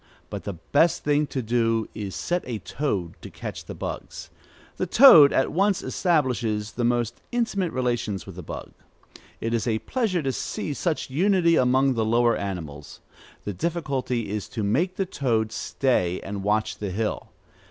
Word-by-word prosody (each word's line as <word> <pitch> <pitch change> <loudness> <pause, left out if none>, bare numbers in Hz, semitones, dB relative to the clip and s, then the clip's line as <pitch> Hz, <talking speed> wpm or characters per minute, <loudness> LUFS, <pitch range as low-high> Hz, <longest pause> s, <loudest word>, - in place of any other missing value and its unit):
But - - -6
the 100 - -3
best 145 - +1
thing 150 0 +2
to 130 -1 -3
do 115 -1 +1
is 100 -3 -5
set 175 0 -1
a 120 -3 -3
toad 95 - -3
to - - -8
catch - - -7
the - - -7
bugs. - - -6 0.5
The 185 - -1
toad 170 - +9
at 135 - +1
once 195 +3 +1
establishes 125 - 0
the 120 +3 -3
most 120 -1 0
intimate 210 -7 0
relations 120 -6 -2
with 95 - -10
the 90 - -7
bug. 80 - -8 0.7
It 115 +1 -2
is 115 0 0
a 110 -2 +1
pleasure 195 - -1
to 135 - 0
see 145 - -4
such 155 -2 -2
unity 175 +2 +3
among 130 +1 +3
the 115 -2 0
lower 120 +2 +3
animals. 80 -7 -6 0.4
The 105 - -4
difficulty 130 - -2
is 105 -1 -4
to 110 - -4
make 155 - +1
the 195 - -1
toad 115 - 0
stay 115 -7 0
and 100 0 -5
watch 105 +2 0
the 105 - -3
hill. 105 +3 -3
120 Hz, 170 wpm, -25 LUFS, 105-155 Hz, 0.7 s, toad